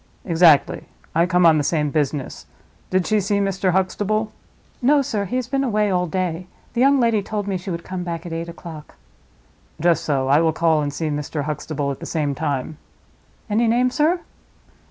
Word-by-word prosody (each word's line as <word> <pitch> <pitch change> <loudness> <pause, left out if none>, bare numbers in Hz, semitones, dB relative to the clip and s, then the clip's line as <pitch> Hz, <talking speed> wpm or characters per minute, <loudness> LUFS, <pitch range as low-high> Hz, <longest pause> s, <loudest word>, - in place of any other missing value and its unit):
"Exactly; 165 -4 +4 0.3
I 170 +2 +3
come 180 -1 +3
on 160 -2 +6
the - - 0
same 150 0 0
business. 145 -3 -2 0.4
Did 185 -1 +1
she 215 -1 +2
see 205 +1 0
Mr. 195 -1 0
Huxtable?" 210 +3 0 0.5
"No, 280 +3 +4
sir; 210 -5 -2
he 200 - -4
has 255 -2 -1
been 270 +1 0
away 210 -5 +1
all 180 -1 +1
day. 180 0 -2 0.3
The 235 - 0
young 275 +1 +5
lady 230 -3 +2
told 205 0 -4
me 195 - -1
she 185 +2 -5
would 170 -1 -4
come 185 -1 -5
back 170 -1 -5
at 170 - -6
eight 165 +1 -4
o'clock." 165 -2 -10 0.8
"Just 170 0 +2
so. 135 -3 0
I 145 +4 +4
will 160 -1 +2
call 160 -1 +2
and 145 -1 -2
see 155 +2 -3
Mr. 150 0 -3
Huxtable 150 -1 -3
at 135 - -6
the - - -7
same 150 -3 -1
time." 140 +2 -3 0.7
"Any 225 +2 +2
name, 245 +2 +2
sir?" 320 +7 +1
180 Hz, 195 wpm, -21 LUFS, 155-210 Hz, 0.8 s, on